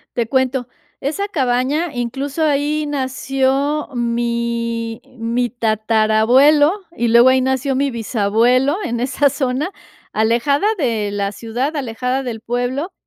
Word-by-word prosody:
Te 235 -2 0
cuento, 260 0 0 0.3
esa 315 +9 -2
cabaña, 280 0 0
incluso, 265 +5 -3
ahí 300 +1 0
nació 270 +1 -1
mi 235 -1 -2 0.2
mi 235 +1 0
tatarabuelo, 225 +6 +3 0.2
y 235 -5 0
luego 235 +2 +6
ahí 260 0 +3
nació 265 +1 0
mi 275 +1 0
bisabuelo 235 - +1
en 235 0 -2
esa 270 +3 +2
zona, 270 +3 -1 0.4
alejada 240 - +2
de 225 - -1
la 200 0 -2
ciudad, 245 +8 -3
alejada 255 0 -2
del 235 -3 -5
pueblo, 245 - -3
250 Hz, 120 wpm, -18 LUFS, 235-280 Hz, 0.4 s, luego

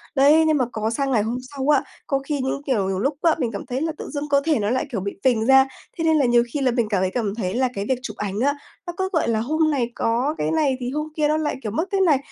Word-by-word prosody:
Đấy, 290 +4 +6
nhưng 310 -1 +3
mà 255 - +2
có 220 0 -2
sang 270 +4 -1
ngày 225 -5 +3
hôm 235 +3 -2 0.2
sau 270 +1 -2
á, 290 -3 +4 0.2
có 275 -1 +1
khi 285 +1 -3
những 265 +1 -2
kiểu, 215 -9 +1
nhiều 190 -1 -1
lúc 275 +5 -1
á, 330 -2 +4
mình 240 -4 -1
cảm 200 - -6
thấy 255 +3 -3
là 320 0 0
tự - - -7
dưng 295 0 -4
cơ 280 -1 +3
thể 310 -7 +2
nó 205 +1 0
lại, 260 +4 0
kiểu, 215 - -2
bị 200 0 -5
phình 230 -4 +2
ra. 265 +1 +6 0.3
Thế 330 - -2
nên 320 -1 +4
là 280 - +3
nhiều 240 -1 +4
khi 290 - -1
là 255 -2 +2
mình 235 -3 0
cảm 200 -3 +1
thấy 185 - 0
cảm 210 -2 -2
thấy 190 -4 -2
là 255 +1 +1
cái 200 -1 -3
việc 260 -1 +1
chụp - - -6
ảnh 205 0 -3
á, 285 +4 +2 0.3
nó 345 - -4
cứ, 380 0 -1
gọi 320 - +1
là, 220 -1 +1
hôm 310 +7 +1
này 245 -4 -1
có 250 +7 0
cái - - -1
này 295 -5 +1
thì 245 -1 -3
hôm 300 +1 -2
kia 300 -1 +2
nó 305 +1 +2
lại, 310 -1 -1
kiểu, 215 - -3
mất 320 - -1
cái 390 -1 +1
này, 315 -7 +4
265 Hz, 315 wpm, -22 LUFS, 230-300 Hz, 0.3 s, Đấy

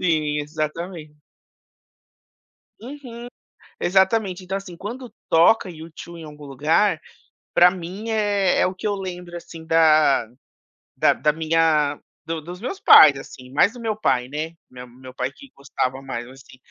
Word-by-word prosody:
Sim, 155 -4 0
exatamen 155 +1 -6 1.6
Uhum, 245 -2 -9 0.5
exatamente. 190 0 +1
Então, 190 +1 -4
assim, 185 -3 -10
quando 240 +5 -7 0.2
toca 170 +6 +4
U2 165 +1 -10
em - - -9
algum 150 -1 -11
lugar, 155 +7 +1 0.6
pra 180 +1 +7
mim, 190 +5 -7
é 205 -3 +1
é - - +3
o 185 - -3
que 185 - -6
eu 205 - 0
lembro 180 -3 -7
assim 165 -1 -10
da 155 -6 +4 0.7
da - - +3
da 150 +4 +1
minha 155 -2 +1 0.3
do 165 -1 -4
dos 175 +4 -9
meus 255 - -5
pais, 150 - +8
assim, 130 -1 -12
mais 180 +9 +3
do 245 - -11
meu 225 -2 -2
pai 130 -11 0
né, 150 +4 -4 0.2
me 125 0 -10
meu 130 +1 -13
pai 130 0 -3
que 265 - -16
gostava 135 -1 -3
mais 120 -3 -6
assim, 130 0 -16
165 Hz, 150 wpm, -22 LUFS, 150-190 Hz, 1.6 s, pais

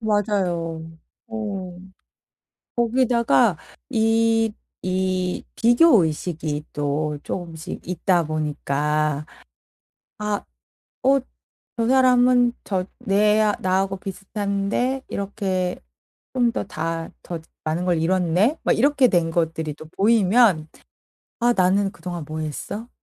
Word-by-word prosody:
맞아요. 180 -7 -1 0.4
어. 200 -5 -5 1.0
거기다가 235 -4 +3 0.3
이 225 -1 +2 0.3
이 185 0 -1
비교 240 - +5
의식이 155 -1 -3
또 145 +1 -1
쪼금씩 165 -3 -6
있다 180 0 +1
보니까 150 0 -1 0.9
아 210 -1 -2 0.6
'어 275 +1 +4 0.6
저 230 0 +1
사람은 250 -1 +5
저 185 -2 -1 0.2
내 210 +2 +4 0.2
나하고 190 +1 +1
비슷한데 200 +6 -2
이렇게 190 -3 -2 0.5
좀 245 -2 +2
더 - - -2
다 165 -1 -3
더 170 -2 -5 0.2
많은 160 +3 -1
걸 175 -3 +1
이뤘네?' 185 - +2
막 - - +2
이렇게 275 +1 +4
된 170 -5 +1
것들이 160 -2 -1
또 155 - -11
보이면 205 -4 +4 0.7
'아 240 0 +3
나는 195 0 +2
그동안 175 -4 -6
뭐 155 0 -5
했어?' 155 +9 -5
190 Hz, 190 characters per minute, -23 LUFS, 165-225 Hz, 1.0 s, 비교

